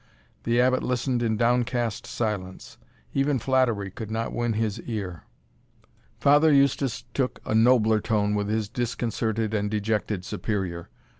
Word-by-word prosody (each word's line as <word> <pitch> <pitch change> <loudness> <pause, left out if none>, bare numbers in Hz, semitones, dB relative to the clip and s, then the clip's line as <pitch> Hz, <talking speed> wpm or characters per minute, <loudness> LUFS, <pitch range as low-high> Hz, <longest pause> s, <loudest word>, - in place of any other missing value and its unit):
The 120 +1 +2
Abbot 130 +1 +3
listened 125 0 -1
in 110 -2 0
downcast 120 -1 0
silence; 105 -6 -4 0.3
even 140 0 +2
flattery 120 -6 +1
could 110 +2 -7
not 115 +1 -3
win 120 -1 0
his 110 -2 -1
ear. 95 -8 -5 0.9
Father 145 +2 +5
Eustace 140 -2 +2
took 130 -2 -1
a - - -2
nobler 110 -1 +4
tone 105 -2 +1
with 105 -1 -1
his 110 -1 0
disconcerted 115 -1 -2
and 105 -1 0
dejected 105 -2 -1
Superior. 90 -6 -3
115 Hz, 135 wpm, -26 LUFS, 105-125 Hz, 0.9 s, Father